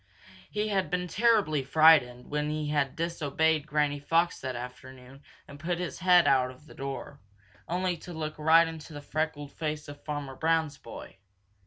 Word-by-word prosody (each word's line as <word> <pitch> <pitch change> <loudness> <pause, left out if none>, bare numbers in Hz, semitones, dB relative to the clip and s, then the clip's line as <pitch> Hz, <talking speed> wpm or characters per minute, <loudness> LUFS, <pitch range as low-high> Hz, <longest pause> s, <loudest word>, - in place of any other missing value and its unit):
He 210 +1 -2
had 195 -2 0
been 180 0 -1
terribly 205 -7 +2
frightened 135 -3 +5
when 150 0 -2
he 150 -1 -2
had 145 -3 0
disobeyed 160 -2 0
Granny 150 -1 0
Fox 165 +4 +1
that 130 -1 -4
afternoon 125 +2 -10 0.3
and 140 - -12
put 170 +3 -2
his 180 0 -5
head 180 -1 +5
out 130 +1 +1
the - - -14
door, 140 +1 -6 0.5
only 180 +1 0
to 180 - -10
look 155 -2 -5
right 165 +2 +6
into 160 -1 -9
the 145 - -7
freckled 145 -1 -3
face 150 -1 -4
of 145 0 -11
Farmer 145 -3 -5
Brown's 160 -1 0
boy. 115 -4 -11
150 Hz, 165 wpm, -29 LUFS, 140-165 Hz, 0.5 s, right